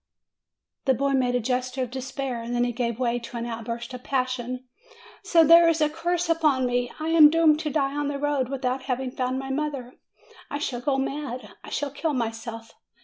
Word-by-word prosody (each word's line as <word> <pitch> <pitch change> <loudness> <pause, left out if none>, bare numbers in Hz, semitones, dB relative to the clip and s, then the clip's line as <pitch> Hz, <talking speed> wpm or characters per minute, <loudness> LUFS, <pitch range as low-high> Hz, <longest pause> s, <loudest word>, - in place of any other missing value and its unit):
The 265 -2 +4
boy 275 +3 0
made 255 -2 +2
a - - +3
gesture 255 +2 -1
of 245 - -6
despair. 265 -2 -4
Then 240 0 +1
he 245 - 0
gave 235 -1 -2
way 245 -1 0
to 235 0 -8
an 235 - -3
outburst 235 +1 -5
of 250 0 -8
passion. 255 -1 -2 0.6
"So 345 -5 +5
there 335 +2 +8
is 325 -1 +1
a 305 -1 +3
curse 345 +2 -1
upon 305 -6 +2
me! 245 0 0
I 315 +1 -2
am 320 -2 +8
doomed 315 -1 +4
to 310 - -2
die 275 -2 0
on 290 0 -1
the 285 -1 -2
road, 280 -3 0
without 260 -1 -2
having 260 -1 -2
found 255 0 -2
my 270 0 -4
mother! 275 -3 -3 0.6
I 285 - -3
shall 250 -4 -3
go 270 +1 +1
mad! 270 -2 -4
I - - -9
shall 290 -1 -2
kill 300 +2 -2
myself! 225 -2 -4
260 Hz, 205 wpm, -25 LUFS, 245-295 Hz, 0.6 s, there